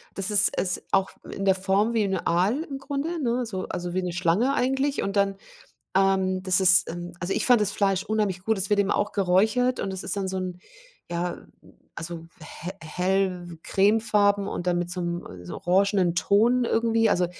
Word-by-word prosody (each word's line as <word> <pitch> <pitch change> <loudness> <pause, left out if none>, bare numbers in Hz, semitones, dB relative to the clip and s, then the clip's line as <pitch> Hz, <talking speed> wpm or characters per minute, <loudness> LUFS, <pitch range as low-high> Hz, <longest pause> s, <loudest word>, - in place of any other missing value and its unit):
Das 195 +2 -3
ist 205 0 +5
es 180 -1 -1
auch 195 0 +2 0.2
in 195 - -4
der 190 -1 +4
Form 195 +4 +1
wie 220 -2 +2
n' 195 -1 0
Aal 195 - +1
im 275 -4 -7
Grunde, 290 +4 -3
ne, 245 0 0
so, 190 -5 -5
also 175 0 -4
wie 185 - 0
'ne 180 -1 -3
Schlange 185 +10 +1
eigentlich 270 +2 0
und 195 +1 -3
dann, 200 0 +2 0.6
ähm, 190 -1 +2
das 185 0 +2
ist 185 0 +5
ähm, 175 +1 -7
also 180 +2 -2
ich - - 0
fand 245 -3 +5
das 205 -1 0
Fleisch 195 -1 0
unheimlich 210 -4 -1
gut, 220 0 +1
es 190 +1 -1
wird 205 -1 +4
eben 200 - +1
auch 205 - -1
geräuchert 215 +7 +2
und 195 - -3
es 190 0 -6
ist - - -2
dann 195 -1 -2
so 190 - -3
'n, 180 -1 -5 0.5
ja, 175 0 -3 0.5
also 165 0 -6 0.4
he 175 - -4
hell 180 0 -1
cremefarben 205 -1 +2
und 175 - -5
dann 175 -1 +1
mit 175 0 -3
so 180 - -4
'nem 170 - -5
so 90 - -7
orangenen 190 -1 +2
Ton 235 +7 +3
irgendwie. 225 -1 +2
Also 180 -2 +2
195 Hz, 200 wpm, -25 LUFS, 180-215 Hz, 0.6 s, ist